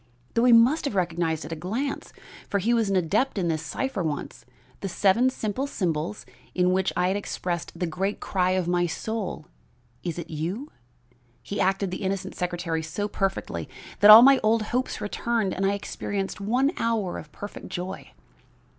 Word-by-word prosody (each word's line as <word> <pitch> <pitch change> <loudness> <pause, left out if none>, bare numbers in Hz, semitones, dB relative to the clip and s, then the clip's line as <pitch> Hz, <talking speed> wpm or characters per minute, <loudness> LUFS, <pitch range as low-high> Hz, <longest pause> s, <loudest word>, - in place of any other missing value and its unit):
Though 230 +1 +3
he 250 - +6
must 240 +8 +5
have 280 - -2
recognized 170 -3 0
at 155 - -8
a - - -2
glance 225 - -3 0.4
for 200 - +1
he 220 +5 +1
was 225 -3 +2
an 195 - +1
adept 205 +9 +1
in 175 -3 0
this 160 -1 -1
cipher 265 -7 -3
once 155 -4 -4 0.3
the 195 - -4
seven 205 +7 +3
simple 255 +2 -3
symbols 170 - -2 0.3
in 180 0 +3
which 190 0 +1
I 180 0 +2
had 190 - 0
expressed 175 -4 -4
the 180 - -1
great 190 +5 -2
cry 185 -2 0
of 180 -2 -1
my 175 0 +2
soul 220 +7 -4 0.6
'Is 170 -2 -4
it 170 - -6
you?' 180 - -4 0.7
he 200 - -3
acted 190 0 +1
the 185 - -5
innocent 190 -1 -2
secretary 175 -2 -2
so 160 +6 -3
perfectly 195 -1 -2 0.3
that 205 - +7
all 220 +2 +12
my 275 0 +7
old 220 +1 +2
hopes 255 +1 -1
returned 215 -1 -1
and 195 +1 0
I 200 - +2
experienced 200 0 -4
one 250 +8 +2
hour 225 -6 -1
of 150 - -12
perfect 205 +6 -8
joy. 185 +2 -6
195 Hz, 180 wpm, -26 LUFS, 175-225 Hz, 0.7 s, all